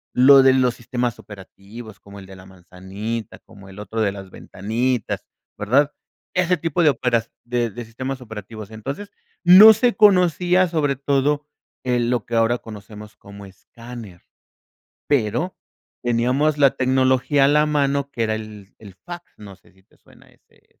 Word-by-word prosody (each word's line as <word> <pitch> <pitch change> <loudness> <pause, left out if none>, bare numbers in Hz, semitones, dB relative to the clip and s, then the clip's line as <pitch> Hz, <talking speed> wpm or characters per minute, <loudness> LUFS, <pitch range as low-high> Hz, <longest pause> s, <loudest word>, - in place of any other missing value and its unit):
lo 135 +2 +7
de 130 - +5
los 125 -2 +1
sistemas 120 -1 -3
operativos, 105 +2 -13
como 100 0 -13
el 95 - -12
de 95 - -12
la 95 - -15
manzanita, 95 +5 -8
como 100 -3 -17
el 95 +2 -13
otro 110 +2 -6
de 100 -2 +1
las 95 -1 -10
ventanitas, 115 +4 -3 0.3
¿verdad?, 135 +8 +1 0.4
ese 180 0 +1
tipo 165 +1 -1
de 155 - +5
opera 120 -2 -1 0.2
de 120 -1 -1
de 120 +3 -8
sistemas 130 +4 -6
operativos. 110 -2 -10
Entonces, 135 - -7 0.3
no 195 +5 +9
se 240 +2 +1
conocía, 180 -3 +3
sobre 150 -4 -1
todo, 145 +2 0 0.4
eh, 125 -1 0
lo 120 -1 -1
que 115 - -5
ahora 115 +2 +2
conocemos 105 -1 -12
como 100 0 -13
escáner. 110 0 -12 0.9
Pero 145 - -1 0.5
teníamos 125 +6 0
la 140 -2 +4
tecnología 130 +2 +2
a - - +3
la 150 +1 +3
mano 140 -1 -1
que 115 - -4
era 110 - -1
el 105 -2 -11
el 100 -4 -14
fax, 175 - -11
no 100 -3 -12
sé, - - -26
si 95 - -27
te - - -30
suena - - -22
ese - - -31 0.2
ese. - - -39
120 Hz, 165 wpm, -21 LUFS, 105-140 Hz, 0.9 s, no